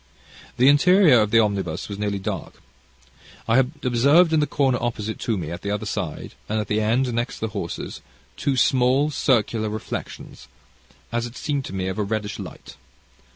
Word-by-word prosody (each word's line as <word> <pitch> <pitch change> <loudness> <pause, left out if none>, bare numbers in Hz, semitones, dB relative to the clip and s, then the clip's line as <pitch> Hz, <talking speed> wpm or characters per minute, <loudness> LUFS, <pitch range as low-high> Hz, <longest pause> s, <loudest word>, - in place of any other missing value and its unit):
"The 125 - +5
interior 155 - +6
of 105 -1 +2
the 115 - +3
omnibus 100 -7 -1
was 100 -1 -7
nearly 105 -1 -1
dark. 95 - -5 0.9
I 115 +1 +3
had 130 0 +3
observed 140 +7 +4
in 160 - +4
the 150 - +1
corner 135 -3 +1
opposite 110 -2 -3
to 115 -3 -1
me 80 -3 -5
at 85 - -6
the 100 - -4
other 105 0 -2
side, - - -4 0.2
and 110 +1 0
at 105 - -4
the 105 +1 +1
end 120 +4 +1
next 120 +2 -2
the 110 - -3
horses, - - -5 0.3
two 135 -2 -1
small 130 +4 +3
circular 115 -5 +1
reflections, 110 0 -7 0.6
as 120 0 -1
it 120 - -12
seemed 145 -3 -2
to - - -7
me 95 -1 -2
of 95 +2 -3
a - - +1
reddish 105 0 -3
light. - - -10
115 Hz, 185 wpm, -23 LUFS, 105-135 Hz, 0.9 s, interior